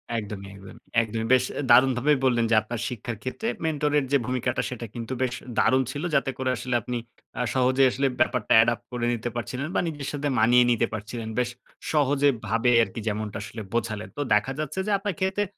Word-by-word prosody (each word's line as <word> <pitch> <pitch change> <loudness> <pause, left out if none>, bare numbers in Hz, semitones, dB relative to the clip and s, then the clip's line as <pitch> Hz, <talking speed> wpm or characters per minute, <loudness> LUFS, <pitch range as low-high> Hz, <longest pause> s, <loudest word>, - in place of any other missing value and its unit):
একদমই, 100 -3 -5
একদমই। 95 -1 -13 0.2
একদমই। 115 0 -3
বেশ 130 0 +5 0.3
দারুণভাবেই 130 +3 +5
বললেন 120 -2 +3
যে, - - +6
আপনার 115 +1 -5
শিক্ষার 120 -1 -5
ক্ষেত্রে 175 - -4 0.2
মেন্টর 150 -2 0
এর 135 - -3
যে 140 - +5
ভূমিকাটা, 125 0 -1
সেটা 120 -2 -6
কিন্তু 120 +2 -5
বেশ 125 -1 0 0.2
দারুণ 130 +1 +4
ছিল। 145 +4 -5
যাতে 135 -1 +2
করে 130 -1 -1
আসলে 125 +3 -2
আপনি 125 +2 -3 0.4
আ - - +1
সহজে 130 +1 +3
আসলে 135 +2 +1
ব্যাপারটা 125 -7 +2
এডাপ 115 0 0
করে 120 -1 -2
নিতে 120 +1 -3
পারছিলেন 125 +5 -3
বা - - +3
নিজের 145 -3 -5
সাথে 145 0 -2
মানিয়ে 120 +2 +6
নিতে 115 - +2
পারছিলেন। 110 +2 -5
বেশ 120 -1 +1 0.4
সহজে 145 -1 +3 0.2
ভাবে 115 +3 +2
আরকি, 115 - -5
যেমনটা 105 0 -2
আসলে 105 +2 -7
বোঝালেন। 110 -2 -2
তো - - -1
দেখা 105 +6 +2
যাচ্ছে 155 +4 -3
যে, - - 0
আপনার 195 -3 -3
ক্ষেত্রে 190 +2 0
125 Hz, 195 wpm, -25 LUFS, 115-135 Hz, 0.4 s, যে